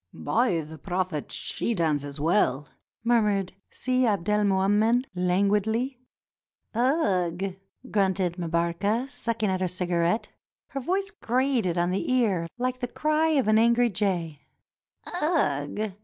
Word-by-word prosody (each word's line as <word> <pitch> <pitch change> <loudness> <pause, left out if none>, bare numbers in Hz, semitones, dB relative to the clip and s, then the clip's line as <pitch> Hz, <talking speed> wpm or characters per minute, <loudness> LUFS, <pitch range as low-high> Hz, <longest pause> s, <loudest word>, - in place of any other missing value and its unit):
"By 230 -9 +1
the 155 +1 -10
Prophet, 180 -5 -3
she 235 - -2
dances 145 -4 -1
well," 150 -4 +1 0.4
murmured 210 -5 +2 0.2
Si 255 0 -1
Abdelmoummen 210 +3 +2
languidly. 205 +8 +1 0.7
"Ugh!" 195 - +1 0.4
grunted 190 -3 +1
Mbarka, 170 +8 0
sucking 230 -5 -2
at 185 0 -1
her 185 - +1
cigarette; 180 +3 0 0.4
her 275 - -4
voice 385 +8 -1
grated 250 - 0
on 175 +1 +1
the 225 - -1
ear 205 -10 +2
Hke 255 0 -1
the 245 - -2
cry 305 +5 +1
of 270 -7 +2
an 215 0 +5
angry 235 +1 +4
jay. 175 -6 -1 0.4
" 355 - -9
Ugh 210 - 0
200 Hz, 120 wpm, -26 LUFS, 175-240 Hz, 0.7 s, an